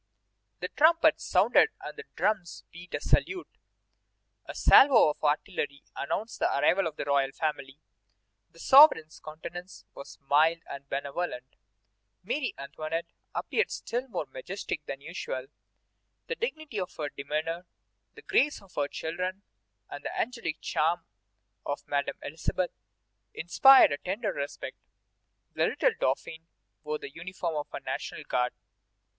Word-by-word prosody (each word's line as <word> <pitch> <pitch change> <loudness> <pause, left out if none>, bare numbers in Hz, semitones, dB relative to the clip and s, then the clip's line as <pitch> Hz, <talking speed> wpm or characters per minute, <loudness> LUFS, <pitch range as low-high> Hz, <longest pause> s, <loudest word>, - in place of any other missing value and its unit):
The 180 - -3
trumpets 320 +4 +4
sounded - - +4
and - - -8
the 445 - -9
drums 195 -5 -1
beat 175 +1 -8
a - - -2
salute. 370 -1 0 0.9
A - - -7
salvo 260 - +7
of - - -13
artillery 145 -1 -1
announced 215 +10 -3
the - - +2
arrival 180 +5 +3
of 155 - -6
the - - -4
royal 140 -1 +2
family. 140 -2 -3 0.7
The - - -22
sovereign's 265 - +6
countenance 175 +4 -9
was 140 - -11
mild 160 +4 +4
and 140 0 -9
benevolent. 140 -2 -4 0.7
Marie 280 -4 -2
Antoinette 155 +4 -5 0.2
appeared 440 - 0
still 245 +3 -3
more 180 - -3
majestic 155 +4 -6
than 135 - -5
usual. 140 -5 -5 0.8
The - - -3
dignity 310 - -4
of 185 - -5
her 150 -2 -3
demeanor, 155 +5 -3 0.5
the - - -13
grace 290 +2 +2
of 195 -2 -20
her 145 -1 0
children, 180 +6 -4 0.4
and - - -8
the - - -4
angelic 230 -10 -3
charm 165 +2 0 0.6
of 145 - -4
Madame 140 -1 -1
Elisabeth 165 +4 -2 0.6
inspired 265 - +7
a 145 - -2
tender 200 +2 -2
respect. 140 +1 -5 0.8
The - - +2
little - - +2
Dauphin 165 - -2 0.4
wore 150 0 -2
the 140 - -9
uniform 170 -1 -4
of 150 - -3
a - - -5
National - - -5
Guard. 125 0 0
165 Hz, 135 wpm, -29 LUFS, 145-200 Hz, 0.9 s, salvo